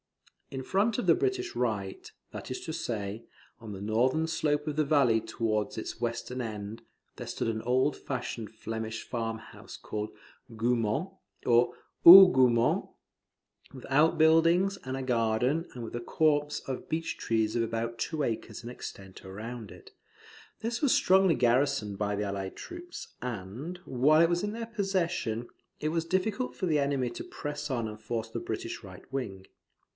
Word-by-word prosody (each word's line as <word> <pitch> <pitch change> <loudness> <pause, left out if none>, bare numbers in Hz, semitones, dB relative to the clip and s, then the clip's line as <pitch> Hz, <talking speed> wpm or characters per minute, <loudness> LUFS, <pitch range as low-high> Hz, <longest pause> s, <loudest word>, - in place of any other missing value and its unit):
In 130 -1 -5
front 200 - +1
of 245 - -1
the - - +6
British 380 -1 -1
right, 105 -6 -2 0.2
that - - -7
is 130 - -3
to 160 - -5
say, 110 -8 -4 0.4
on 110 -2 -9
the 95 - -6
northern 125 +10 +1
slope 150 -2 0
of 150 - -2
the 155 - +3
valley 135 -7 +3
towards 110 -2 -2
its 110 - -5
western 120 +2 -3
end, 110 -1 -6 0.3
there - - -7
stood - - -2
an 110 -1 -1
old 130 +5 +2
fashioned 120 -4 -5
Flemish 110 0 -5
farm 115 -2 -2
house - - -12
called 105 0 -4 0.5
Goumont, 115 - 0 0.3
or 120 0 +4 0.3
Hougoumont, 130 -11 +8 0.8
with 130 - -10
out 150 +5 +4
buildings 165 +5 +4
and 130 +1 -4
a 135 - -3
garden, 125 +6 +1
and 120 - -7
with 115 - -6
a 120 - -3
copse 150 +3 +1
of 130 -1 -6
beach 165 +1 -2
trees 110 -1 0
of 120 - +2
about 115 +1 -3
two 160 -2 -1
acres 115 -1 -3
in 120 - -6
extent 95 -5 -9
round 110 +3 -7
it. - - -14 0.7
This 230 +1 -2
was 285 -4 +4
strongly 190 -2 +4
garrisoned 120 -4 +2
by 105 0 -1
the 105 - -1
allied 100 -1 -4
troops; 350 0 -9
and, 125 - -5
while 140 +5 +4
it 165 - +5
was 175 +2 0
in 205 - -1
their 230 +1 -4
possession, 185 - -1 0.3
it 155 - -1
was 165 +1 0
difficult 195 +8 -1
for 185 - -2
the 155 -4 +2
enemy 140 -3 0
to - - -6
press 150 0 -5
on 120 -4 -1
and 105 0 -8
force 115 0 -3
the 115 - -4
British 115 +1 -5
right 95 -2 -11
wing. 100 -8 -4
125 Hz, 170 wpm, -29 LUFS, 110-160 Hz, 0.8 s, Hougoumont